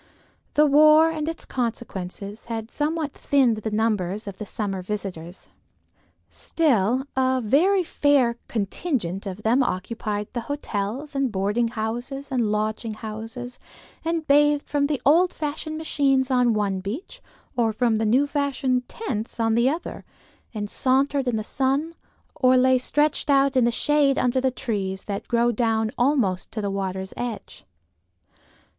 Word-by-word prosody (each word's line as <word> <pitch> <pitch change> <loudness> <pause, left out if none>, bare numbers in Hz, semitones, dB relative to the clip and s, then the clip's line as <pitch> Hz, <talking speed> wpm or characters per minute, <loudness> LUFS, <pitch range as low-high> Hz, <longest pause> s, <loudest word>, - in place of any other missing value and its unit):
The 300 - +6
war 305 +2 +6
and 310 -1 -3
its 330 - -6
consequences 210 -4 -5
had 225 -1 -5
somewhat 300 0 -1
thinned 260 -7 +2
the 215 +1 -3
numbers 210 -2 -1
of 200 -2 -8
the 210 - -6
summer 195 -3 -3
visitors; 180 -3 -6 0.8
still 255 - +1
a 260 0 +2
very 345 - +3
fair 280 -7 +2
contingent 205 - -2
of 195 +2 -7
them 240 +5 +3
occupied 210 -1 -2
the 240 - -2
hotels 275 +1 -3
and 275 -3 0
boarding 205 +4 0
houses 240 +5 -4
and 235 -5 +1
lodging 215 +1 -2
houses 225 +3 -7 0.4
and 330 -1 -1
bathed 295 0 +3
from 285 -1 +1
the 290 -3 -1
old 340 +6 +5
fashioned 310 +1 -4
machines 275 -4 +1
on 245 -3 +3
one 200 -2 0
beach, 265 - -6 0.3
or 230 -2 +2
from 225 0 +1
the 220 - 0
new 255 +6 +4
fashioned 275 -3 -1
tents 235 - -5
on 225 -1 +2
the 235 +3 +3
other, 325 +5 -5 0.5
and 210 -2 -4
sauntered 270 +1 +1
in 245 - +1
the 215 - -2
sun, 275 +7 0 0.4
or 255 -1 +4
lay 255 0 +4
stretched 295 +4 +1
out 275 -1 +4
in 255 -2 +4
the 235 - +2
shade 285 +2 +2
under 250 +1 +1
the 260 - +2
trees 195 -6 -3
that 200 -1 -5
grow 235 0 +2
down 225 -1 0
almost 240 -9 +1
to 220 - -5
the 200 -2 -2
water's 190 -1 -3
edge. 240 -3 -6
245 Hz, 150 wpm, -24 LUFS, 215-280 Hz, 0.8 s, The